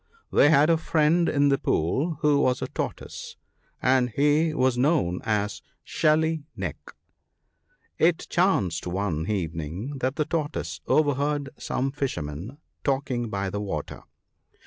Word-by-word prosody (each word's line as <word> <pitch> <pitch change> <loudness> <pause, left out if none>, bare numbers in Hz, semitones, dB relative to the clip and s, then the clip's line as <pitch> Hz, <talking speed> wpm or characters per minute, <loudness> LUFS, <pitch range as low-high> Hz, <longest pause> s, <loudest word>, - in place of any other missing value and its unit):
They 145 - +6
had 150 +2 +5
a 165 - +4
friend 160 +1 +2
in 145 0 +3
the 140 - +2
pool 135 - 0
who 145 -1 +4
was 130 -2 +1
a - - -2
Tortoise, 480 -2 -6 0.5
and 130 -1 +3
he 150 +6 +2
was 130 -4 +2
known 125 - +1
as 105 -1 -1
* - - -47
Shelly 160 0 +1
neck.' - - -6 1.0
It 165 0 +3
chanced 105 - +1
one 90 -3 -2
evening 90 - -3
that 130 +2 -1
the 150 - 0
Tortoise 155 -2 -3
overheard 145 -1 +1
some 135 +1 -2
fishermen 105 - -4 0.3
talking 130 -4 -1
by 100 -2 -2
the 105 - -3
water. 80 -7 -5
135 Hz, 135 wpm, -26 LUFS, 100-155 Hz, 1.0 s, They